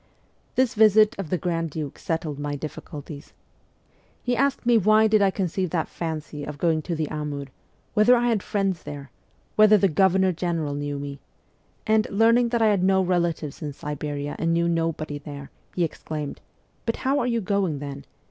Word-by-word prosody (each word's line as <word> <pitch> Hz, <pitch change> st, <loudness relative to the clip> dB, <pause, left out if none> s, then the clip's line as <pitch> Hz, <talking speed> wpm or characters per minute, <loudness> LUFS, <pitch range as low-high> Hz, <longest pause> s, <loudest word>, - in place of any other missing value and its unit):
This 255 Hz, -2 st, +2 dB
visit 215 Hz, -1 st, +5 dB
of 185 Hz, -6 st, -4 dB
the 180 Hz, -, +1 dB
grand 165 Hz, -1 st, -2 dB
duke 150 Hz, -2 st, -6 dB
settled 160 Hz, -3 st, -3 dB
my 145 Hz, 0 st, -3 dB
difficulties. 145 Hz, 0 st, -8 dB, 0.9 s
He 245 Hz, 0 st, 0 dB
asked 275 Hz, 0 st, 0 dB
me 240 Hz, 0 st, +4 dB
why 215 Hz, +1 st, +5 dB
did 215 Hz, -1 st, +4 dB
I 200 Hz, -, +5 dB
conceive 185 Hz, -1 st, -2 dB
that 160 Hz, -1 st, -1 dB
fancy 155 Hz, -3 st, -5 dB
of 145 Hz, 0 st, -6 dB
going 160 Hz, 0 st, +1 dB
to 170 Hz, +2 st, -3 dB
the 155 Hz, -1 st, -1 dB
Amur 150 Hz, -2 st, -4 dB, 0.5 s
whether 220 Hz, +3 st, +6 dB
I 240 Hz, 0 st, +2 dB
had 220 Hz, -4 st, +1 dB
friends 195 Hz, -4 st, -1 dB
there? 140 Hz, -2 st, -8 dB, 0.5 s
whether 215 Hz, 0 st, +7 dB
the 195 Hz, -, +3 dB
Governor 190 Hz, +2 st, +3 dB
General 165 Hz, -4 st, -2 dB
knew 145 Hz, 0 st, -3 dB
me? 140 Hz, 0 st, -6 dB, 0.7 s
and, 215 Hz, -1 st, +3 dB
learning 230 Hz, +3 st, +4 dB
that 235 Hz, -1 st, +1 dB
I 220 Hz, -, +5 dB
had 200 Hz, -3 st, +2 dB
no 190 Hz, 0 st, +4 dB
relatives 170 Hz, -5 st, -1 dB
in 150 Hz, -2 st, -4 dB
Siberia 145 Hz, 0 st, -4 dB
and 165 Hz, 0 st, +1 dB
knew 170 Hz, 0 st, +2 dB
nobody 165 Hz, -3 st, -1 dB
there, 140 Hz, -1 st, -9 dB, 0.2 s
he 180 Hz, -, +1 dB
exclaimed, 155 Hz, -2 st, -5 dB, 0.2 s
' -, -, -40 dB
But 230 Hz, -, +1 dB
how 275 Hz, +2 st, +3 dB
are 245 Hz, -, 0 dB
you 235 Hz, -1 st, +1 dB
going, 195 Hz, -6 st, 0 dB
then 140 Hz, -1 st, -7 dB
170 Hz, 185 wpm, -25 LUFS, 150-210 Hz, 0.9 s, whether